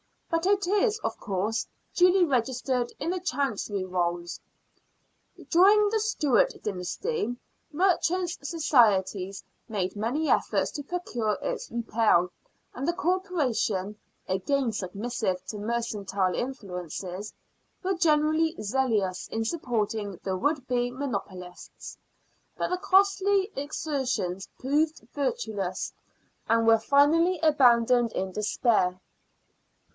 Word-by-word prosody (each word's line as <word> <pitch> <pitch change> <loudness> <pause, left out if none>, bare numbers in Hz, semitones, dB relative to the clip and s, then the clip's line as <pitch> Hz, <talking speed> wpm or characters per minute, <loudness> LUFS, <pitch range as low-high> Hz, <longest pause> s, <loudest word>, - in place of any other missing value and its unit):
But 330 +1 +1
it 400 -1 +2
is, 415 +4 +2
of - - -3
course, 205 +2 -2 0.3
duly 365 +1 +5
registered 255 -2 0
in 320 +5 -1
the 370 - -2
Chancery 255 - -2
Rolls. 175 -1 -2 1.1
During 410 +4 +6
the 440 +1 +1
Stewart 325 - +2
dynasty 240 - -2 0.4
the 295 - -11
Merchants' 360 -1 +1
Society 210 - +2 0.3
made 195 -3 -2
many 245 +10 -1
efforts - - +1
to 295 -3 -6
procure 245 -10 -2
its - - -3
repeal, 225 -6 +2 0.4
and 260 +3 -4
the 345 - +2
Corporation, 310 - -1 0.3
again 240 +7 0
submissive 200 -1 -3
to 210 - -5
mercantile 205 -4 -1
influences, 190 - -5 0.5
were 380 +1 +1
generally 320 -1 +2
zealous 210 -5 0
in 225 0 -3
supporting 220 - -2
the 190 -1 -1
would 285 +6 0
be 245 -1 0
monopolists, 190 -9 -6 0.6
but - - -1
the 365 - 0
costly 390 +1 +3
exertions 265 - -2
proved 295 -1 0
fruitless, 215 -9 -2 0.6
and 230 0 +3
were 225 0 +6
finally 305 +9 +4
abandoned 245 -5 +4
in 190 0 -2
despair. 210 -2 +1
245 Hz, 110 wpm, -27 LUFS, 205-320 Hz, 1.1 s, During